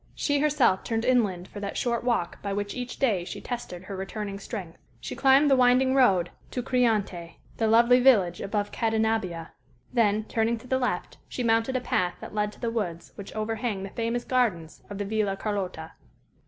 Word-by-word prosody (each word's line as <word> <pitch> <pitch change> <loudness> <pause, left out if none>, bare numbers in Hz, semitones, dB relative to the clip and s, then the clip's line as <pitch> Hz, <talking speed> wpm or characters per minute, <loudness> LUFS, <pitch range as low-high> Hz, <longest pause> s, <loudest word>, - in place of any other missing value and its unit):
She 290 -1 +1
herself 285 -10 +3
turned 225 0 -2
inland 205 -8 +1
for 205 - -9
that 200 -1 -4
short 235 -2 0
walk 235 -8 -1
by 200 -1 -3
which 205 0 -3
each 250 -1 -5
day 210 -10 +1
she - - -7
tested 235 -8 -6
her 195 +1 -7
returning 200 +1 -5
strength. 190 -5 -7 0.2
She - - -6
climbed 275 +2 +5
the - - +7
winding 255 +1 +4
road 195 -10 +3 0.2
to 250 - -3
Criante, 210 -10 0 0.2
the 225 - +1
lovely 235 +3 +5
village 205 -10 +4
above 205 0 -2
Cadenabbia; 220 -7 -1 0.4
then, 215 -3 +2
turning 225 +2 0
to 225 - -13
the 260 +1 +1
left, 245 -8 -2
she 250 - -3
mounted 230 +2 +2
a 255 - +1
path 180 -7 0
that - - -9
led 210 0 0
to - - -18
the 235 -2 -2
woods 175 -7 -4
which 200 +1 -10
overhang 215 -2 -2
the 195 - -7
famous 235 +1 -2
gardens 210 -11 -1
of 205 - -6
the 205 - -3
Villa 205 -1 0
Carlotta. 185 -6 -4
220 Hz, 190 wpm, -27 LUFS, 195-245 Hz, 0.4 s, the